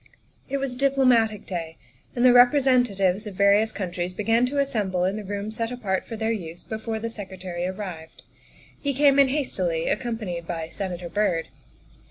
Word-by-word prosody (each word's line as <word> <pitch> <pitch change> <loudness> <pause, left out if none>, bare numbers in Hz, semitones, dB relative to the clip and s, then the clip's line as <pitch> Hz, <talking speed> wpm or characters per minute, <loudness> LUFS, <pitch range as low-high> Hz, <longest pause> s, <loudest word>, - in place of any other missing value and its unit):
It 275 - 0
was 270 -2 -2
Diplomatic 250 -6 +2
Day, 165 -3 -5 0.4
and 245 0 +2
the 250 - +7
representatives 245 -7 +4
of 200 - -7
various 200 +3 +4
countries 180 -2 -4
began 225 +5 +2
to 285 +3 -3
assemble 210 -10 0
in 190 +2 0
the 215 - -5
room 205 +2 -4
set 230 +1 -3
apart 200 -7 -2
for 230 - -5
their 220 0 -1
use 175 -6 -5
before 220 0 -4
the 225 +1 -3
Secretary 185 -5 -5
arrived. 185 -4 -7 0.6
He 280 -2 -2
came 280 0 +5
in 275 - +7
hastily, 185 - -1
accompanied 210 -9 -3
by 165 -2 -4
Senator 180 -1 -5
Byrd. 175 -4 0
210 Hz, 165 wpm, -25 LUFS, 185-245 Hz, 0.6 s, the